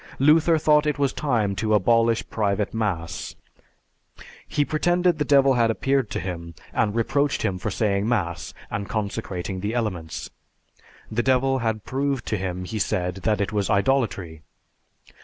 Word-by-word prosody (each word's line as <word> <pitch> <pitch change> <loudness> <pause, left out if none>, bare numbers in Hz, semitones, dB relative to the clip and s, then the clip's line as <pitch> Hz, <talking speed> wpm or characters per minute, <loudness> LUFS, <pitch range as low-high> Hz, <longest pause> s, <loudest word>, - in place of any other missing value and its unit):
Luther 160 +4 +5
thought 150 0 +3
it 150 - 0
was 140 -2 +1
time 115 -9 0
to 110 -1 +2
abolish 115 +3 +3
private 105 -1 0
mass. 95 -7 -3 1.1
He 145 - +1
pretended 175 +2 +1
the - - +3
devil 135 -1 +5
had 120 -2 +3
appeared 135 +1 +1
to - - -3
him 85 -3 -6 0.2
and 105 0 +1
reproached 140 +5 +1
him 95 -4 -1
for 100 - -2
saying 100 +1 0
mass 85 -8 -1 0.2
and 105 0 -3
consecrating 100 -4 -3
the 105 +5 -3
elements. 95 -9 -3 0.8
The 115 +2 +1
devil 130 +1 +2
had 110 -2 -2
proved 135 -1 -1
to 110 - 0
him, 90 -1 -4
he 110 +4 -4
said, 90 -2 -1
that 105 +3 0
it 100 +1 -1
was 100 -1 0
idolatry. 100 - 0
110 Hz, 155 wpm, -24 LUFS, 100-135 Hz, 1.1 s, Luther